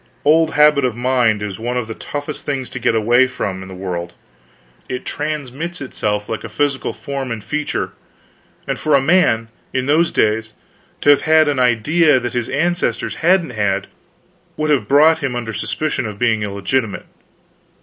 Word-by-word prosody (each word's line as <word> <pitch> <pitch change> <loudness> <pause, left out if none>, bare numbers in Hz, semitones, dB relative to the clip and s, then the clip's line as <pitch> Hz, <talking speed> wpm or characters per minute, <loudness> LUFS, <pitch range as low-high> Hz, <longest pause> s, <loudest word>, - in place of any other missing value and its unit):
Old 160 +2 +4
habit 150 -1 +5
of 125 -3 0
mind 120 -4 +1
is 100 -1 -5
one 120 +2 -2
of 125 - -1
the 110 - -6
toughest 145 +5 -6
things 135 -3 -3
to 125 - -5
get 115 - +1
away 120 +4 +4
from 100 -7 -4
in 95 - -9
the 95 - -9
world. 90 -2 -5 0.8
It 125 0 -4
transmits 150 +3 -4
itself 105 -6 -2
like 110 - -4
physical 140 +5 -1
form 135 -2 -5
and 110 -3 -5
feature; 150 +7 -2 0.8
and - - -2
for 155 -2 +2
a - - +5
man, 135 -7 +2 0.2
in 130 -1 0
those 160 +4 +3
days, 110 +1 0 0.5
to 145 - +6
have 145 - +4
had 155 -1 +4
an 145 -3 0
idea 130 +5 +3
that 120 0 -4
his 120 -2 -2
ancestors 175 +5 -1
hadn't 175 -3 +3
had, 100 -4 0 0.7
would 155 0 0
have 140 - +1
brought 155 +3 +5
him 135 -3 -2
under 115 -2 -4
suspicion 130 +4 -2
of 105 -2 -7
being 110 -1 +1
illegitimate. 105 +3 -2
130 Hz, 170 wpm, -18 LUFS, 110-150 Hz, 0.8 s, to